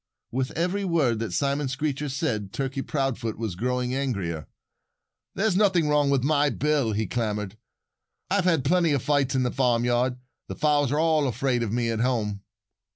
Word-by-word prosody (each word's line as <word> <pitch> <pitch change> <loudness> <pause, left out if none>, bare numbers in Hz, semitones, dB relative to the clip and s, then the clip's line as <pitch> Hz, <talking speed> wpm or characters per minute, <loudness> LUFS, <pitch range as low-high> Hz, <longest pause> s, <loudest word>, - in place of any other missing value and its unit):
With 130 +1 -1
every 180 +4 0
word 150 - +1
that 110 -4 -3
Simon 140 +8 0
Screecher 145 +2 -2
said, 110 -7 -2
Turkey 135 0 -2
Proudfoot 135 -6 -2
was 110 -4 -3
growing 125 +5 -1
angrier. 100 - -2 0.9
"There's 195 -1 +1
nothing 185 -6 +3
wrong 145 -1 +3
with 135 -3 +2
my 145 0 +3
bill," 140 -3 0
he 110 +1 0
clamored. 105 -2 -2 0.7
"I've 195 -2 +1
had 165 -7 +2
plenty 170 0 +3
of 140 - 0
fights 140 -2 +1
in 130 - +2
the 125 - 0
farmyard. 125 0 +1 0.3
The - - -6
fowls 145 -3 +2
are 145 - +1
all 160 -3 +3
afraid 125 +1 0
of 115 -3 -2
me 115 0 0
at 110 - -2
home." 110 -5 0
130 Hz, 170 wpm, -26 LUFS, 115-150 Hz, 0.9 s, nothing